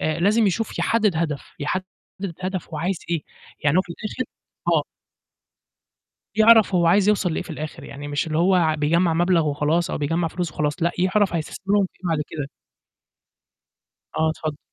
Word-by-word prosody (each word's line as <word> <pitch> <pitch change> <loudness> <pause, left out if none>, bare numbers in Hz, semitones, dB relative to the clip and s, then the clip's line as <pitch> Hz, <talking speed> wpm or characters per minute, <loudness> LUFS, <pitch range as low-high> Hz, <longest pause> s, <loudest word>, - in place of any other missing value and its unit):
آآ 155 +1 -1
لازم 215 +4 +4
يشوف 215 +4 -1
يحدِّد 215 -6 +2
هدف، 155 -3 -2
يحدِّد 180 +6 -1 0.6
هدف 185 -1 -3
هو 155 -2 -5
عايز 180 +3 -1
إيه، 165 -3 0 0.4
يعني 150 +3 +4
هو - - +7
في 175 - -8
الآخر 220 +7 -4 0.4
آه. - - +3 1.5
يعرَف 220 -2 +6
هو 175 -1 +3
عايز 195 +3 +4
يوصَل 200 -3 +2
لإيه - - -1
في - - -14
الآخر، 155 -1 -6
يعني 145 +1 -8
مش 145 +2 -1
اللي 155 0 -1
هو 175 -3 +3
بيجمّع 165 +3 +2
مبلغ 170 -1 +3
وخلاص 150 +4 +1
أو - - -1
بيجمّع 165 +3 0
فلوس 175 0 -3
وخلاص، 150 -1 0
لأ، 170 - +2
يعرَف 190 +1 +2
هيستثمرهم 195 +5 0
في - - -30
إيه 180 - -1
بعد 155 -2 +1
كده. 145 -3 -4 1.7
آه، 160 - +2
اتفضل. 155 -2 -4
170 Hz, 170 wpm, -23 LUFS, 155-190 Hz, 1.7 s, هو